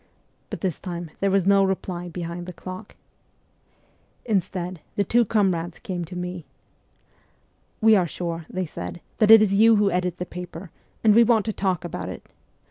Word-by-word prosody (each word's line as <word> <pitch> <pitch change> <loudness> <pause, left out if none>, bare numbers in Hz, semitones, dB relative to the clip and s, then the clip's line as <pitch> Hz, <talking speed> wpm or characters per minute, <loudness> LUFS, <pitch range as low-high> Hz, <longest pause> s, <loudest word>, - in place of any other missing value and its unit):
But - - -6
this 185 -6 -2
time 175 -3 -6
there 195 - +1
was 195 -2 +2
no 195 0 +5
reply 180 -2 -2
behind 175 0 -6
the 180 - -7
clock. 185 +4 -9 1.3
Instead 185 -5 -2
the 200 - +2
two 235 +5 +3
comrades 185 -6 0
came 175 -2 -5
to 180 +3 -10
me. 180 -2 -5 0.7
' - - -40
We 220 0 +6
are 180 -3 +2
sure/ 170 -1 -5
they 185 0 -2
said, 170 +2 -7
' - - -38
that 215 -2 +4
it 225 -1 +10
is 200 -2 +1
you 225 +3 +6
who 205 -1 +3
edit 180 0 -1
the 180 - -4
paper, 180 -1 -8 0.3
and 215 -2 +6
we 235 +2 +7
want 225 -3 +3
to 220 - -2
talk 185 -4 -1
about 170 - -5
it. - - -10
185 Hz, 185 wpm, -24 LUFS, 175-200 Hz, 1.3 s, it